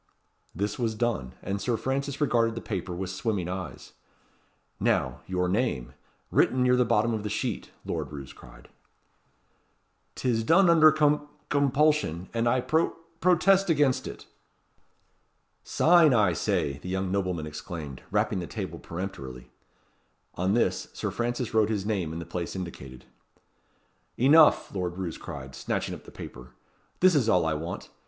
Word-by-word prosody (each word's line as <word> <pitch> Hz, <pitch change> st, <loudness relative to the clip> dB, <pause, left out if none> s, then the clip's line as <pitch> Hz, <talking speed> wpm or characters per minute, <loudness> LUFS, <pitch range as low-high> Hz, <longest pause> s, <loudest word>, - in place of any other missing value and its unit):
This 100 Hz, +6 st, -2 dB
was 115 Hz, -2 st, 0 dB
done; 105 Hz, -, -2 dB
and 100 Hz, +1 st, -3 dB
Sir 115 Hz, +3 st, 0 dB
Francis 140 Hz, +3 st, -2 dB
regarded 115 Hz, -6 st, +2 dB
the -, -, -3 dB
paper 95 Hz, -5 st, -4 dB
with 95 Hz, +1 st, -4 dB
swimming 95 Hz, -2 st, -2 dB
eyes. 90 Hz, -1 st, -6 dB, 0.9 s
"Now, 65 Hz, 0 st, 0 dB
your 90 Hz, -1 st, 0 dB
name, 95 Hz, -, -1 dB, 0.4 s
written 130 Hz, 0 st, +3 dB
near 125 Hz, 0 st, +4 dB
the 125 Hz, -, +4 dB
bottom 115 Hz, 0 st, +2 dB
of 110 Hz, -, -2 dB
the 105 Hz, -, -4 dB
sheet," -, -, -3 dB, 0.2 s
Lord -, -, -3 dB
Roos 70 Hz, -2 st, -8 dB
cried. -, -, -15 dB, 1.5 s
"'Tis 115 Hz, -3 st, 0 dB
done 170 Hz, +8 st, +5 dB
under 155 Hz, -2 st, +7 dB
com 150 Hz, -1 st, +2 dB, 0.2 s
compulsion; 140 Hz, -, +2 dB
and 115 Hz, 0 st, +1 dB
I 130 Hz, +1 st, +2 dB
pro 160 Hz, +6 st, +1 dB, 0.2 s
protest 185 Hz, +2 st, +4 dB
against 145 Hz, -5 st, +2 dB
it." -, -, -9 dB, 1.4 s
"Sign, 165 Hz, -5 st, +5 dB
I 100 Hz, -6 st, +4 dB
say," 70 Hz, -3 st, -1 dB
the 90 Hz, -, -8 dB
young 95 Hz, 0 st, -1 dB
nobleman 90 Hz, -5 st, -1 dB
exclaimed, 75 Hz, -2 st, -7 dB
rapping -, -, +1 dB
the 85 Hz, -, -5 dB
table -, -, -5 dB
peremptorily. 65 Hz, -9 st, -7 dB, 0.8 s
On 95 Hz, +4 st, 0 dB
this, 120 Hz, -, +1 dB
Sir -, -, -3 dB
Francis 120 Hz, 0 st, -2 dB
wrote 110 Hz, -1 st, +3 dB
his 105 Hz, -3 st, -1 dB
name 95 Hz, -7 st, -1 dB
in 80 Hz, -, -5 dB
the 85 Hz, -, -6 dB
place 85 Hz, +1 st, -4 dB
indicated. 65 Hz, -9 st, -8 dB, 1.1 s
"Enough!" 150 Hz, +5 st, +5 dB
Lord 90 Hz, -2 st, -3 dB
Roos 90 Hz, -4 st, -4 dB
cried, 65 Hz, 0 st, -8 dB
snatching -, -, -3 dB
up -, -, -10 dB
the -, -, -12 dB
paper. 65 Hz, +1 st, -10 dB, 0.5 s
"This 185 Hz, 0 st, +6 dB
is 130 Hz, -7 st, +2 dB
all 90 Hz, -5 st, +3 dB
I 80 Hz, -, +1 dB
want. 80 Hz, +4 st, -5 dB
105 Hz, 150 wpm, -27 LUFS, 85-130 Hz, 1.5 s, under